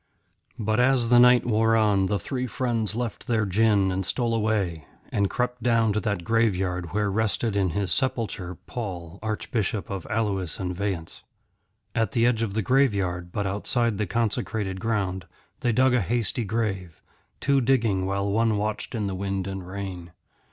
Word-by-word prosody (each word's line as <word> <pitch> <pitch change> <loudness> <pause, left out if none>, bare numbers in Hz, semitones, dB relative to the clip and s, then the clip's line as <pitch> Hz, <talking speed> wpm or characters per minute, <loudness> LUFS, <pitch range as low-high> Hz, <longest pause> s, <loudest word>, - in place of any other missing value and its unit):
But 110 +1 0
as 125 -2 +3
the 120 0 +7
night 125 0 +6
wore 115 -1 +3
on 105 -3 +3
the 100 +1 0
three 125 +7 -3
friends 115 -2 -1
left 120 -2 -4
their 110 -3 +1
gin 100 -1 +3
and 95 +1 -1
stole 115 +4 0
away, 105 -8 -1 0.2
and 100 -1 +1
crept 125 0 -2
down 115 -2 +3
to 105 - +1
that 100 -5 -2
graveyard 95 -6 0
where 105 +1 0
rested 110 +1 0
in 95 -2 +2
his 100 -3 0
sepulchre 105 -9 -1
Paul, 95 -6 -6
Archbishop 110 -1 -2
of 95 -3 -5
Alois 100 -6 -1
and 90 -1 -3
Vayence. 95 -4 -4 0.7
At 115 -1 0
the 115 -2 +3
edge 120 -2 +2
of 105 -3 -2
the 110 - 0
graveyard, 95 -9 +1
but 100 +2 -2
outside 105 +3 +1
the 105 - 0
consecrated 105 -2 -1
ground, 95 -5 -2 0.3
they 120 - +1
dug 130 +3 +3
a 125 - +3
hasty 115 - -1
grave, 95 -6 -3 0.4
two 140 -1 +2
digging 115 -7 +2
while 100 +1 -1
one 110 0 +2
watched 105 +4 -2
in 110 -2 -1
the 100 - -2
wind 95 0 -2
and 95 -2 -5
rain. 95 -3 -6
105 Hz, 170 wpm, -25 LUFS, 95-115 Hz, 0.7 s, the